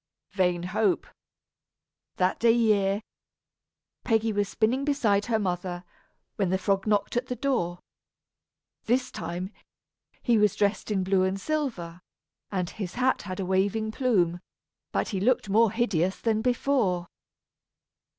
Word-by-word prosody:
Vain 180 -3 +1
hope! 335 - +1 1.1
That 185 0 +1
day 230 -1 +5
year, 210 -3 +2 1.0
Peggy 225 -2 +1
was 205 -1 0
spinning 240 +5 +1
beside 225 -8 +1
her 230 -2 +2
mother, 180 -3 -3 0.5
when 195 -3 +1
the 190 - +2
frog 195 +1 0
knocked 205 0 +1
at 245 +1 0
the 250 - -3
door. 245 - -1 1.1
This 250 +2 +1
time, 180 +3 -5 0.7
he 235 -2 +3
was 210 -1 +3
dressed 205 +1 0
in 195 -3 0
blue 190 0 +2
and 190 +1 0
silver, 195 - -3 0.5
and 185 -3 -1
his 190 -1 -6
hat 255 +1 +1
had 185 - -4
a 190 - -1
waving 200 +4 0
plume; 190 -9 +1 0.5
but - - -1
he 195 - -2
looked 235 0 +1
more 220 +3 +5
hideous 195 -6 0
than 220 -2 +1
before. 245 -7 +1
205 Hz, 135 wpm, -27 LUFS, 185-235 Hz, 1.1 s, day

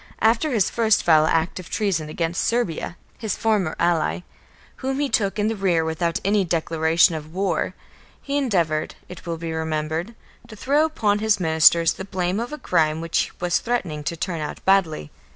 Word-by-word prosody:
After 230 +7 +2
his 220 -6 +2
first 225 -2 +2
foul 155 -2 +5
act 165 +3 0
of 185 - -10
treason 185 -8 -1
against 165 +2 -2
Serbia, 195 -7 -1 0.2
his 220 -4 -3
former 205 -7 0
ally, 170 0 +1 0.6
whom 270 +1 -3
he 290 - +1
took 200 -3 0
in 210 0 +1
the 225 - -1
rear 180 -5 +1
without 165 +1 -1
any 200 0 +3
declaration 165 -1 +2
of 155 +1 -7
war, 185 -1 -1 0.4
he 280 - -4
endeavoured, 175 - 0
it 180 -1 -11
will 165 -1 -3
be 165 0 -5
remembered, 160 +5 -3 0.3
to 215 - -11
throw 285 +8 +2
upon 210 -10 0
his 215 -1 +2
ministers 165 0 +4
the - - -7
blame 185 0 -2
of 240 +3 -4
a 300 - -5
crime 160 - +1
which 165 0 -1
was 175 0 +1
threatening 170 -11 -2
to 170 - -3
turn 170 -1 -3
out 150 - -6
badly. 175 - +2
175 Hz, 180 wpm, -23 LUFS, 160-215 Hz, 0.6 s, foul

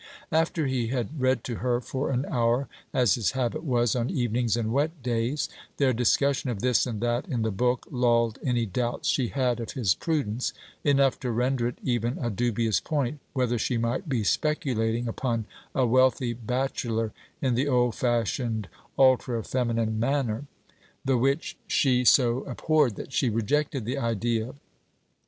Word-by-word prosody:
After 160 0 +1
he 130 -3 0
had 130 +4 -3
read 130 -2 +2
to 120 -3 -4
her 120 0 0
for 130 +3 -3
an 130 +1 0
hour, 120 +2 +1 0.2
as 125 -6 +3
his 115 -2 0
habit 130 +1 -1
was 120 -6 +1
on 120 0 0
evenings 120 - 0
and 115 -1 -1
wet 145 +1 -1
days, 120 +4 0 0.3
their 135 -2 +3
discussion 130 +3 +2
of 115 -5 -3
this 125 0 +2
and 110 -3 -4
that 120 +4 0
in 125 -9 -1
the 110 - 0
book 125 +5 0
lulled 115 -3 +2
any 120 -3 +1
doubts 120 +4 -2
she 130 -3 +2
had 125 -2 0
of 115 - -5
his 110 -10 +2
prudence, 130 - -1 0.3
enough 140 -2 +3
to 125 - -3
render 125 +1 +1
it 120 - -5
even 120 0 0
a 120 -2 -1
dubious 115 0 +1
point 145 -2 -2
whether 125 -3 0
she 120 +2 0
might 120 +9 -1
be 120 -6 0
speculating 120 - 0
upon 115 -1 -2 0.3
a 130 - +3
wealthy 125 0 +3
bachelor 120 -2 -2 0.3
in 130 -3 +1
the 130 +4 +1
old 125 -3 +2
fashioned 115 -3 -1 0.3
ultra 125 -3 +3
feminine 115 -3 -1
manner; 125 -1 0 0.6
the 135 -1 +3
which 135 +5 0
she 125 -3 +3
so 120 -1 +5
abhorred 140 -2 +1
that 135 - -8
she 130 - +2
rejected 125 +3 0
the 130 +4 -2
idea. 115 +1 -1
125 Hz, 165 wpm, -27 LUFS, 115-130 Hz, 0.6 s, so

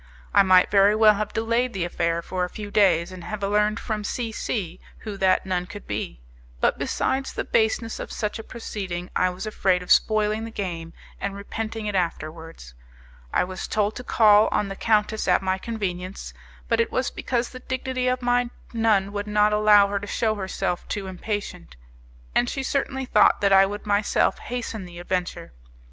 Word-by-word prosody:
I - - +7
might 185 -2 +5
very 200 +1 +5
well 215 -1 +6
have 210 0 -3
delayed 230 +2 0
the 190 -3 -2
affair 170 -1 -1
for 185 +1 -2
a 180 - -2
few 205 +1 -8
days, 185 -5 +3
and 185 -2 -9
have 215 +1 -5
learned 210 +2 +1
from 215 -2 -3
C 230 +2 -3
C 185 -5 -3 0.2
who 210 -2 -6
that 190 -1 +2
nun 180 -1 -2
could 205 +1 -10
be; 100 - -4 0.4
but, - - +1
besides 265 0 -1
the - - -2
baseness 225 0 0
of - - -6
such 210 +1 -3
a - - -6
proceeding, 190 -7 -6
I 185 - +3
was 180 +3 -6
afraid 190 -4 +1
of 180 - -5
spoiling 215 0 +3
the 225 - -5
game 170 -6 -5 0.3
and 200 0 -3
repenting 220 +2 -5
it 210 - -2
afterwards. 165 - -4 0.6
I - - +2
was 185 +1 -5
told 210 0 0
to 250 - -7
call 215 -3 +5
on 200 - 0
the 195 - -5
countess 215 0 +1
at - - +3
my 190 0 0
convenience, 190 -4 -5 0.3
but - - +1
it 460 -1 +1
was - - -1
because 245 -1 -2
the 255 - -9
dignity 260 0 -3
of 250 0 0
my 245 0 +2 0.2
nun 215 -4 +2
would 205 0 -4
not 210 0 +3
allow 210 -1 +6
her 200 0 -1
to 205 - -8
shew 220 +1 0
herself 190 -3 -3
too 200 -2 -3
impatient; 190 - -5 0.6
and 120 - +2
she 270 - -3
certainly 265 -1 -1
thought 210 -4 +4
that 200 -1 +3
I 195 0 +7
would 205 +2 -6
myself 205 0 +1
hasten 230 -5 -5
the 175 -1 -11
adventure. 180 - -3
205 Hz, 190 wpm, -24 LUFS, 185-220 Hz, 0.6 s, I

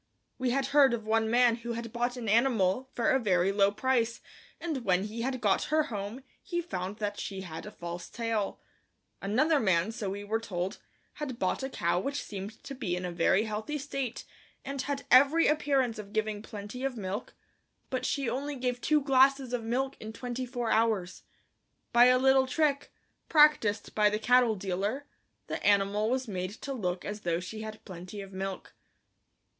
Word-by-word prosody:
We 255 -1 +1
had 270 +2 +1
heard 275 -4 +6
of 220 -2 -8
one 220 0 +2
man 240 0 +4
who 235 0 -5
had 230 0 -6
bought 245 +1 -1
an 235 -2 -5
animal 230 +1 +2
for 235 - +2
a 265 - +3
very 190 -4 +2
low 200 0 +3
price 235 +1 0 0.4
and 310 -7 -3
when 185 -2 +2
he 215 +3 -5
had 255 +1 -2
got 205 -4 +2
her 310 0 +2
home 205 +6 -5 0.2
he 345 -3 -3
found 200 - -4
that 205 -1 -3
she 195 -1 -5
had 170 0 -7
a - - -7
false 175 -1 -7
tail; 230 -4 -2 0.6
another 275 +10 +2
man, 190 -3 +2
so 215 -3 -4
we 200 +1 -5
were 220 +2 -1
told, 185 -4 -4 0.4
had 265 -5 -4
bought 185 +2 0
a 265 - -3
cow 170 -8 0
which 280 +8 -3
seemed 205 +1 -8
to 275 - -7
be 195 -9 -2
in 180 0 -4
a 180 - -3
very 175 +4 +3
healthy 220 +7 -3
state, 275 -4 -4 0.4
and 275 0 -3
had 280 0 -3
every 285 +5 +6
appearance 275 -6 +1
of 205 0 -9
giving 215 -1 -1
plenty 215 +3 -7
of 270 -3 -2
milk, 200 +2 -5 0.6
but 255 - -1
she 275 -3 -1
only 280 +4 -2
gave 250 -1 -2
two 305 -1 +3
glasses 270 -1 +4
of 240 -2 -1
milk 265 +4 -1
in 220 - -7
twenty 250 +2 -5
four 240 -2 -2
hours. 215 -5 +1 0.7
By 240 +1 +8
a 250 0 +6
little 265 0 +4
trick, 285 0 0 0.4
practiced 295 -10 +4
by 210 -1 +4
the 210 - -1
cattle 245 0 +4
dealer, 200 +8 -2 0.4
the - - -5
animal 205 +1 +3
was 255 0 -1
made 185 -1 -3
to 275 - -4
look 180 -7 -3
as 210 0 -5
though 170 -2 0
she 215 +4 -7
had 215 0 -8
plenty 185 +1 -8
of 195 0 -10
milk. 190 0 -5
225 Hz, 190 wpm, -30 LUFS, 200-265 Hz, 0.7 s, By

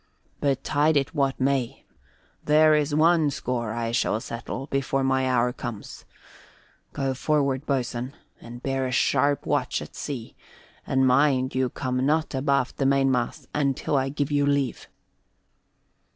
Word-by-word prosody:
Betide 145 +2 +1
it 140 +3 -1
what 140 -3 0
may, 130 -2 -1 0.6
there 155 +1 +5
is 150 -1 +1
one 160 -1 +4
score 120 -5 -3
I 115 0 -2
shall 115 -2 +1
settle 115 +3 -6
before 135 -1 -1
my 130 -1 +1
hour 125 -1 +2
comes. 120 -5 -8 0.9
Go 135 -2 -2
forward, 140 0 0
boatswain, 125 -1 -2 0.3
and 120 +1 -10
bear 135 -1 -1
a - - -4
sharp 140 +2 +2
watch - - 0
at - - -10
sea, 130 -6 -6 0.5
and 130 0 +2
mind 130 0 +3
you 130 -1 0
come 130 0 -2
not 155 +3 +1
abaft 140 -1 0
the 135 - 0
mainmast 135 -3 +1
until 140 0 0
I 135 0 +1
give 145 +1 -2
you 145 0 +2
leave." 140 -3 0
135 Hz, 140 wpm, -25 LUFS, 125-145 Hz, 0.9 s, there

